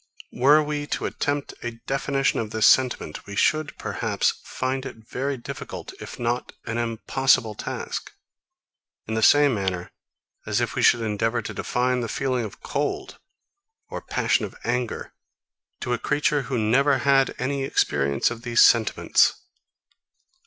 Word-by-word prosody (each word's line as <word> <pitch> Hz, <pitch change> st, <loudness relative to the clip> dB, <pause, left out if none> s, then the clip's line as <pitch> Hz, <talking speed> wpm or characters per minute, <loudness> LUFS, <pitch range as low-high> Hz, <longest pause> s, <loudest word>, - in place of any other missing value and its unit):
40. -, -, -11 dB
Were 150 Hz, +4 st, +6 dB
we 145 Hz, -1 st, -3 dB
to -, -, -2 dB
attempt 145 Hz, 0 st, -2 dB
a 120 Hz, -1 st, -5 dB
definition 135 Hz, 0 st, 0 dB
of 110 Hz, -, -3 dB
this 110 Hz, 0 st, +1 dB
sentiment, 125 Hz, -13 st, +2 dB
we 100 Hz, -, -7 dB
should, 155 Hz, +7 st, +1 dB
perhaps, -, -, 0 dB
find 130 Hz, +1 st, -3 dB
it 135 Hz, -, -7 dB
a 110 Hz, -, -18 dB
very 135 Hz, +2 st, -2 dB
difficult, 120 Hz, -, -7 dB
if -, -, -8 dB
not 120 Hz, +1 st, -2 dB
an 115 Hz, +1 st, -2 dB
impossible 115 Hz, 0 st, +1 dB
task; -, -, -5 dB, 0.9 s
in 110 Hz, -, -4 dB
the 110 Hz, -, 0 dB
same 145 Hz, +4 st, +6 dB
manner 95 Hz, -4 st, -2 dB, 0.6 s
as -, -, +1 dB
if -, -, -1 dB
we -, -, -1 dB
should 120 Hz, -, +5 dB
endeavour 115 Hz, +2 st, -1 dB
to -, -, -6 dB
define 125 Hz, +1 st, 0 dB
the 115 Hz, -, -3 dB
feeling 130 Hz, -3 st, -1 dB
of 105 Hz, -, -8 dB
cold 145 Hz, +1 st, -3 dB, 0.7 s
or -, -, -5 dB
passion -, -, 0 dB
of -, -, -6 dB
anger, 120 Hz, -1 st, -2 dB, 0.7 s
to 125 Hz, -, -1 dB
a 120 Hz, -, -1 dB
creature 145 Hz, 0 st, +1 dB
who 130 Hz, -, 0 dB
never 135 Hz, +6 st, +3 dB
had 135 Hz, +1 st, +3 dB
any 135 Hz, +2 st, -1 dB
experience 70 Hz, -, +1 dB
of 120 Hz, -1 st, -6 dB
these 120 Hz, 0 st, +4 dB
sentiments. 115 Hz, -2 st, +4 dB
125 Hz, 155 wpm, -24 LUFS, 115-135 Hz, 0.9 s, Were